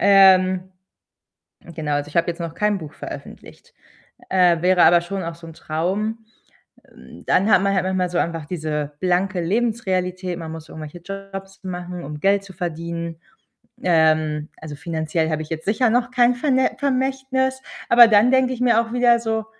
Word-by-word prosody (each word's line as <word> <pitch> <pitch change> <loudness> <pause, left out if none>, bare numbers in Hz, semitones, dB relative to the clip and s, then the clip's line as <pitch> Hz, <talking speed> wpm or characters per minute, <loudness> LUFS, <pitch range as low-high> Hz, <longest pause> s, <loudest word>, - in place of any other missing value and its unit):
ähm, 190 -1 +5 1.0
genau, 155 -2 -3
also, 145 0 -2
ich 150 - -9
habe 170 0 +2
jetzt 170 - -3
noch 165 -1 -5
kein 210 -1 0
Buch 155 -2 -9
veröffentlicht. - - -11 0.5
Äh, 180 -3 +3
wäre 180 -1 +4
aber 175 0 +6
schon 190 +2 -5
auch 165 -1 -5
so 165 0 -13
'n 165 - -10
Traum. 190 +9 -2 0.7
Hm, - - -15
dann 200 +4 +2
hat 190 - +5
man 200 - +1
halt 185 - +1
manchmal 185 -1 -1
so 175 - -1
einfach 165 -2 -2
diese 150 -3 -3
blanke 185 0 0
Lebensrealität. 185 -3 -1
Man 160 -2 -7
muss 160 -1 -9
irgendwelche 155 +2 -9
Jobs 195 +1 -9
machen, 180 -1 -6
um 150 +1 -7
Geld 195 +3 +2
zu 195 - -12
verdienen. 170 -1 -5 0.7
Ähm, 155 -3 +2
also 155 -2 -8
finanziell 160 +1 -2
habe 155 -1 -2
ich 155 - -7
jetzt 160 0 -5
sicher 225 +4 +2
noch 245 +1 +1
kein 245 0 +3
Verne 260 0 +1
Vermächtnis, 265 -1 -1 0.3
aber 235 0 +8
dann 215 +3 +5
denke 260 -1 +3
ich 250 - -7
mir 235 -2 +4
auch 230 - -7
wieder 240 -1 +4
so: 220 -1 -2
185 Hz, 175 wpm, -21 LUFS, 165-220 Hz, 1.0 s, aber